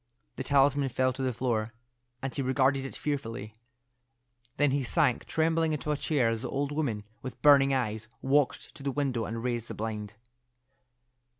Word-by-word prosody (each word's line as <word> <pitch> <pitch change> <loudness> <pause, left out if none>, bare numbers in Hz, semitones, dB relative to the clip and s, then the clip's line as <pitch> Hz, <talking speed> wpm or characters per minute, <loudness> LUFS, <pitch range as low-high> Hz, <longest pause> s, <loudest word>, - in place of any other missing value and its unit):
The 130 - -2
talisman 140 0 +3
fell 130 +1 +1
to 130 - -6
the 130 -1 +1
floor, 115 -1 -1 0.5
and 135 - -3
he 145 - -2
regarded 135 +1 +2
it 135 - -7
fearfully. 115 -7 -4 1.0
Then 145 -1 +3
he 140 +1 +1
sank 125 0 +1
trembling 160 0 +1
into 150 0 -2
a - - +2
chair 145 -4 +1
as 115 -1 -2
the 130 - -4
old 140 +1 -1
woman, 135 -9 -1 0.2
with 130 +1 -7
burning 140 -2 +7
eyes, 110 -4 -1
walked 140 +1 +1
to - - -10
the 140 0 -1
window 130 -5 -1
and 115 +2 -4
raised 120 -2 -2
the - - -6
blind. 105 -1 -4
130 Hz, 175 wpm, -29 LUFS, 115-140 Hz, 1.0 s, burning